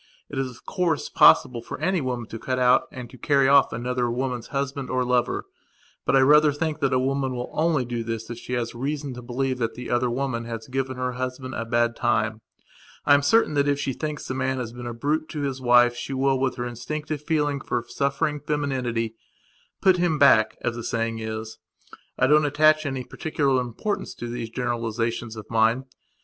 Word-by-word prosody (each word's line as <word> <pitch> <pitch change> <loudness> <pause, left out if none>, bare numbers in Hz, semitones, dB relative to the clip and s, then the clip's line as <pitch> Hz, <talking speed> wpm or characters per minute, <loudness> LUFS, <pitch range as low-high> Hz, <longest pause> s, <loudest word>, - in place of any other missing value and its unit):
It 140 - -3
is, 135 -1 -1
of 125 - -15
course, 170 -5 -1
possible 125 -4 +5
for - - -7
any 185 -3 +1
woman 125 -3 -3
to 115 - -7
cut 130 +2 -2
out 125 0 +4
and 125 -2 -7
to 130 - -14
carry 140 -2 +3
off 140 0 +5
any 120 +2 -4
other 125 -1 0
woman's 125 -1 -2
husband 140 -1 -3
or 130 0 0
lover. 125 -1 0 0.6
But - - +3
I 135 - +6
rather 150 +2 +6
think 155 +1 -2
that 135 -2 +1
a 130 - +3
woman 135 0 0
will 125 0 -5
only 155 -5 +1
do 120 -1 -3
this 115 -1 -4
if 120 - -6
she 125 - -7
has 120 -1 -2
reason 140 +2 -3
to 125 - -8
believe 130 +1 -2
that 115 -2 -1
the 125 0 -6
other 120 0 +2
woman 120 -2 -2
has 115 -1 -6
given 130 0 -3
her 125 0 -1
husband 130 +1 -5
a 115 - -3
bad 120 0 +1
time. 110 -2 0 0.6
I 145 - +6
am 140 - +5
certain 155 +3 +3
that 140 -1 +2
if 145 0 +1
she 135 -2 -1
thinks 150 +2 -5
the - - -3
man 130 0 -1
has 120 -2 -4
been 120 0 -7
a 120 - -4
brute 155 +6 -1
to 150 - -4
his 135 -2 -3
wife 120 -1 +5
she 135 - -5
will, 135 0 +1
with 130 -1 0
her 120 - -3
instinctive 145 +5 -4
feeling 150 -3 0
for 120 -3 -2
suffering 140 +3 -1
femininity, 130 -7 -2 0.7
"put 190 -2 +5
him 175 -3 +1
back", 130 -7 +5
as 120 -1 -1
the 120 - -6
saying 115 0 -2
is. 110 0 -5 0.6
I - - +3
don't 150 +2 +5
attach 155 +1 +4
any 135 -2 -3
particular 140 -3 0
importance 125 - -4
to 120 - -6
these 120 -1 -5
generalizations 115 -1 -2
of 110 -2 -8
mine. 115 +3 +2
130 Hz, 210 wpm, -24 LUFS, 120-140 Hz, 0.7 s, I